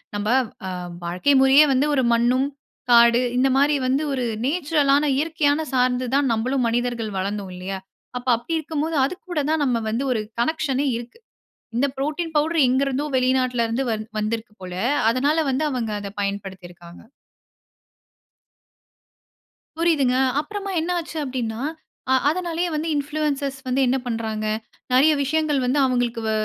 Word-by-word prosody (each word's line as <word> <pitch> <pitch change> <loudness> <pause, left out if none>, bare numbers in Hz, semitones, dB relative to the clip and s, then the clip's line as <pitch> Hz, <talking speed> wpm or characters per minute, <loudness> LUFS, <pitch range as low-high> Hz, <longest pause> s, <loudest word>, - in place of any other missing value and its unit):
நம்ம 205 +1 -2 0.4
அ - - -3 0.3
வாழ்க்கை 180 +11 +1
முறையே 270 +3 +7
வந்து 265 +2 +2
ஒரு 265 - +2
மண்ணும், 245 +3 +2 0.4
காடு 235 0 +6
இந்த 260 +2 +3
மாரி 285 +2 +3
வந்து 265 +3 +1
ஒரு 255 -2 -1 0.2
நேச்சுரல் 295 -2 +1
ஆன 295 +1 +1
இயற்கையான 305 -1 +1
சார்ந்து 250 0 +2
தான் 275 -2 +2
நம்மளும் 245 +3 0
மனிதர்கள் 235 -2 -2
வளந்தோம் 195 0 -3
இல்லையா? 190 +1 -5 0.4
அப்ப 250 +1 -9
அப்டி 235 +8 -7
இருக்கும் 310 -1 -3
போது 320 0 -2
அது 275 - -1 0.2
கூட 345 - -2
தான் 315 -2 +1
நம்ம 245 -4 +1
வந்து 235 +5 -1
ஒரு 225 - 0 0.2
கனெக்ஷனே 290 0 0
இருக்கு. 240 - -9 0.6
இந்த 280 +3 +3
ப்ரோட்டின் 310 +4 -2
பவுடர் 310 -1 +3
எங்க 260 +2 +2
இருந்தோ 275 +2 -1
வெளிநாட்ல 255 -2 +1
இருந்து 230 +4 -1
வந் 215 -1 -3
வந்துருக்கு 220 +1 -3
போல, 180 -1 -7 0.4
அதனால 280 +6 +1
வந்து 270 +4 0
அவங்க 235 -4 -2
அத 200 - -5
பயன்படுத்திருக்காங்க. 190 -4 -6 2.8
புரியுதுங்க, 295 -7 +2 0.2
அப்பறமா 400 +4 -5
என்ன 330 +3 -3
ஆச்சு 330 -1 -7
அப்டின்னா, 240 -5 -3 0.5
அ - - +5
அதனாலேயே 345 +1 -1
வந்து 310 +2 -2
இன்ஃப்ளூயன்ஸர்ஸ் 285 -2 -2
வந்து 255 +1 0
என்ன 250 +2 +2
பண்றாங்க? 220 -2 -3 0.5
நிறைய 290 +5 +6
விஷயங்கள் 305 0 +1
வந்து, 260 +4 +1
அவங்களுக்கு 245 -2 0
வ - - 0
260 Hz, 145 wpm, -22 LUFS, 235-295 Hz, 2.8 s, முறையே